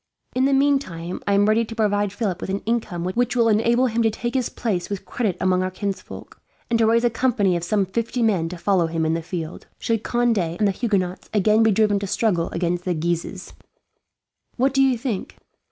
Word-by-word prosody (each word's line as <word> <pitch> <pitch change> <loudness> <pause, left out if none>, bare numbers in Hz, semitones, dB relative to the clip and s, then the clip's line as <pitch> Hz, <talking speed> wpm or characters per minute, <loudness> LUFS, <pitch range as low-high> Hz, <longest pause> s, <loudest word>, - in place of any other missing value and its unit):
In 255 +1 +2
the 275 - +3
meantime 270 -12 0
I 200 - +3
am 200 +1 +4
ready 215 +2 +3
to 225 0 -7
provide 205 -2 +1
Philip 200 -4 -3
with - - -5
an 195 +1 -2
income 220 -7 -1
which 240 +7 0
will 235 -2 +3
enable 230 +3 +3
him 235 -1 0
to 225 - +3
take 240 +2 -4
his 255 -3 0
place 190 -7 -2
with 200 -2 -5
credit 215 -7 -2
among 185 0 +2
our 185 - -1
kinsfolk, 195 +1 -6 0.3
and 230 - +3
to 225 - +4
raise 230 +1 +3
a 240 - +4
company 225 -6 +1
of 170 - -2
some 195 +3 +1
fifty 230 +5 -2
men 185 -7 +1
to 180 - -7
follow 180 -1 +2
him 165 0 -1
in 160 - +1
the 165 - -1
field, 165 -1 -6
should 225 -2 -1
Conde 240 -3 +1
and 175 +4 0
the - - +2
Huguenots 190 -4 -2
again 215 +2 +4
be 225 - +5
driven 210 -1 +3
to 200 - -4
struggle 185 -5 0
against 175 0 -1
the 180 -1 -1
Guises. 170 +1 -3 1.0
"What 265 +2 +2
do 270 - +3
you 265 -2 +3
think?" 225 -5 -4
205 Hz, 220 wpm, -22 LUFS, 180-230 Hz, 1.0 s, be